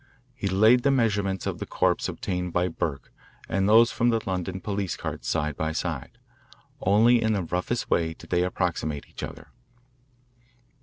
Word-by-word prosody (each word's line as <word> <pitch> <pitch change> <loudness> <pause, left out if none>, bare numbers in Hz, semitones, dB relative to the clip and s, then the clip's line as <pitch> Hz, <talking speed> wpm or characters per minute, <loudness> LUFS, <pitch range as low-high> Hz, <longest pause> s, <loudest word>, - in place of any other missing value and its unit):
He 120 -6 -4
laid 110 +6 +5
the 140 - +2
measurements 100 -7 +1
of - - -3
the - - -4
corpse - - +1
obtained 90 -1 -3
by 90 +1 +1
Burke 80 -4 -4 0.4
and 95 +2 +1
those 115 +2 +6
from 120 - +2
the 115 -1 +2
London 95 0 -3
police 100 -2 -3
card - - -5
side 75 -2 -1
by 80 0 -2
side. 80 -5 -4 0.6
Only 115 +5 +4
in 110 -1 +2
the 100 -3 0
roughest 90 +8 -2
way 80 -1 +1
did - - -15
they 90 -1 +3
approximate 85 -5 -2
each - - -10
other. - - -8
95 Hz, 165 wpm, -26 LUFS, 85-110 Hz, 0.6 s, those